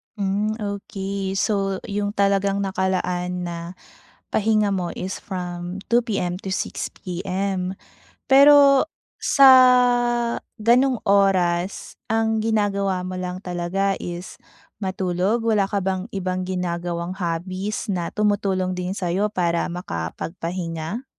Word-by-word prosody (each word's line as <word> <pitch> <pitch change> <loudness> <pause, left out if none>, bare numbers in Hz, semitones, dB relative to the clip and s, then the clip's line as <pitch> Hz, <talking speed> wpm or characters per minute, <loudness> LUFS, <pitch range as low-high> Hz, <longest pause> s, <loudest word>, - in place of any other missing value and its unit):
Hmm 205 +1 -1
okey, 200 -2 -4
so 195 -1 0
yung 205 +1 -3
talagang 200 0 +2
nakalaan 180 -2 -1
na 175 -1 -4 0.7
pahinga 215 -1 +2
mo 185 -3 -2
is 185 +1 -5
from 180 0 -6
2 235 0 +3
PM 180 -5 -1
to 190 - -2
6 - - -3
PM. 185 +1 -3 0.5
Pero 280 +1 +7 0.3
sa 275 -2 +7 1.1
ganong 245 +3 +3
oras, 190 -2 +2 0.2
ang 225 0 +1
ginagawa 200 -4 0
mo 185 - -5
lang 180 0 -4
talaga 185 +2 -1
is 175 +1 -6 0.5
matulog? 190 +4 0
Wala 215 -3 +3
ka 200 - 0
bang 190 +2 -2
ibang 185 -2 -2
ginagawang 175 -1 -3
hobbies 185 +4 -3
na 180 -4 -2
tumutulong 195 -3 0
din 180 0 -3
sayo 190 +2 -1
para 170 -4 0
makapagpahinga? 165 - -5
190 Hz, 110 wpm, -23 LUFS, 180-205 Hz, 1.1 s, Pero